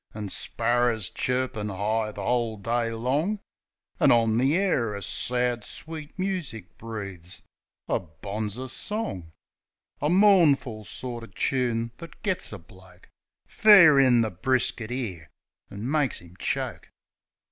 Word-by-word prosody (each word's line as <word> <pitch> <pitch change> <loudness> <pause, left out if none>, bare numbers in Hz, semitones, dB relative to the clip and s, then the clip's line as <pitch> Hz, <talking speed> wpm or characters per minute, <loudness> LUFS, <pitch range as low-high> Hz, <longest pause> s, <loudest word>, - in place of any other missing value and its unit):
An' 105 -2 -5
sparrers 120 -1 0
chirpin' 125 -4 -1
'igh 110 +3 -1
the - - -5
'ole 120 -3 0
day 115 +3 -1
long; 135 - 0 0.6
An' - - +5
on 115 -1 +3
the 135 +5 +3
air 130 - +1
a 100 - -6
sad, 125 -2 0
sweet 155 +3 -8
music 180 - -4
breaves 100 -6 -8 0.4
A - - +1
bonzer 105 - -6
song 115 - -4 0.3
— - - -45
A 145 - +1
mournful 160 - +4
sorter 120 -1 -4
choon 115 +1 -1
thet 170 - -11
gits 195 -4 -2
a 105 - -6
bloke 95 0 -18 0.4
Fair 175 -10 +7
in 125 -3 +5
the 110 -1 0
brisket 120 +3 -1
'ere, 105 - -5 0.4
an' 100 +4 -6
makes 150 -4 +1
'im 85 +1 -16
choke - - -3
120 Hz, 130 wpm, -26 LUFS, 105-135 Hz, 0.6 s, Fair